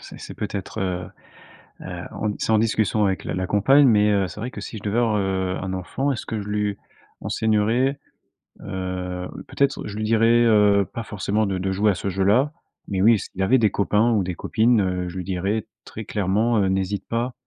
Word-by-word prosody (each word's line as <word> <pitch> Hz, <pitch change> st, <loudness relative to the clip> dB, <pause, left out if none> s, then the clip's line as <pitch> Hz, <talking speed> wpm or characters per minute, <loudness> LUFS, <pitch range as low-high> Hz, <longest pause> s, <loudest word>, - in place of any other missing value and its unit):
c'est -, -, -11 dB
c'est -, -, -9 dB
peut-être, 100 Hz, -2 st, -5 dB
heu, 90 Hz, -1 st, -2 dB, 0.8 s
heu, -, -, -6 dB
on, 105 Hz, -1 st, -2 dB
c'est -, -, -1 dB
en 110 Hz, -, +4 dB
discussion 110 Hz, -1 st, +1 dB
avec 95 Hz, -1 st, -1 dB
la -, -, -4 dB
la 95 Hz, 0 st, -2 dB
compagne, 135 Hz, +9 st, +5 dB
mais, 105 Hz, -3 st, +4 dB
heu, 100 Hz, -2 st, +2 dB
c'est 90 Hz, +4 st, -9 dB
vrai 125 Hz, +3 st, -4 dB
que -, -, -8 dB
si 115 Hz, -, -7 dB
je 100 Hz, -, -11 dB
devais 105 Hz, +2 st, -1 dB
avoir, 115 Hz, -3 st, +2 dB
heu, 95 Hz, -2 st, -1 dB
un 95 Hz, -1 st, -4 dB
enfant, 115 Hz, +10 st, -2 dB
est-ce 125 Hz, -, -4 dB
que 110 Hz, -2 st, -3 dB
je 100 Hz, -, -7 dB
lui 105 Hz, -1 st, -1 dB, 0.4 s
enseignerai? 110 Hz, +5 st, +1 dB, 0.6 s
Heu, 90 Hz, -1 st, -4 dB, 0.2 s
peut-être, 140 Hz, -1 st, 0 dB
je 105 Hz, 0 st, -7 dB
lui 110 Hz, -, -2 dB
dirai, 115 Hz, +2 st, +4 dB
heu, 105 Hz, -3 st, +4 dB
pas 115 Hz, -, -4 dB
forcément 105 Hz, +1 st, -1 dB
de 95 Hz, -1 st, -1 dB
de 95 Hz, +1 st, -2 dB
jouer 100 Hz, +3 st, +2 dB
à -, -, -2 dB
ce 100 Hz, -, -3 dB
jeu-là. 100 Hz, +10 st, +2 dB, 0.4 s
Mais 95 Hz, -2 st, -1 dB
oui, 110 Hz, +3 st, +6 dB
s'il 95 Hz, -1 st, -7 dB
avait 115 Hz, +8 st, +4 dB
des 110 Hz, -5 st, +2 dB
copains 105 Hz, +4 st, +2 dB
ou 105 Hz, -4 st, +2 dB
des 90 Hz, -1 st, -4 dB
copines, 115 Hz, +5 st, +2 dB
heu, 90 Hz, -2 st, -1 dB
je 90 Hz, -, -8 dB
lui 90 Hz, -, -3 dB
dirai 95 Hz, +4 st, -2 dB, 0.2 s
très 110 Hz, -, -8 dB
clairement, 105 Hz, +4 st, +1 dB
heu, 100 Hz, -, +2 dB
n'hésite 95 Hz, +1 st, -2 dB
pas. 120 Hz, +2 st, -2 dB
105 Hz, 215 wpm, -23 LUFS, 95-110 Hz, 0.8 s, oui